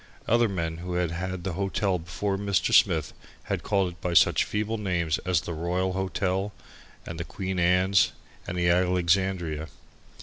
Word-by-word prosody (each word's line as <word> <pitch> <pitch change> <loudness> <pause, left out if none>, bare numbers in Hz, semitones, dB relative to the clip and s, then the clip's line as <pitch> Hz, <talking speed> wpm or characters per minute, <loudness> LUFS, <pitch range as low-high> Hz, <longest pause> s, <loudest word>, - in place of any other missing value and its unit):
Other 120 0 +3
men 85 -4 -3
who 90 +1 -5
had 90 -2 0
had 90 +1 -4
the 95 -1 -3
hotel 95 0 0
before 85 +5 -3
Mr. 100 -2 0
Smith - - +4 0.3
had - - -2
called 95 -3 +1
it 90 - -18
by 90 -1 -2
such - - +5
feeble 105 +1 -2
names 85 -5 0
as 90 -4 +2
the 85 - -5
Royal 90 +3 -1
Hotel 95 +1 -1 0.5
and 85 0 -7
the - - -2
Queen's 95 0 +2 0.4
and 90 - -4
the 85 0 +1
Alexandria. 90 -2 +1
90 Hz, 160 wpm, -27 LUFS, 85-95 Hz, 0.5 s, such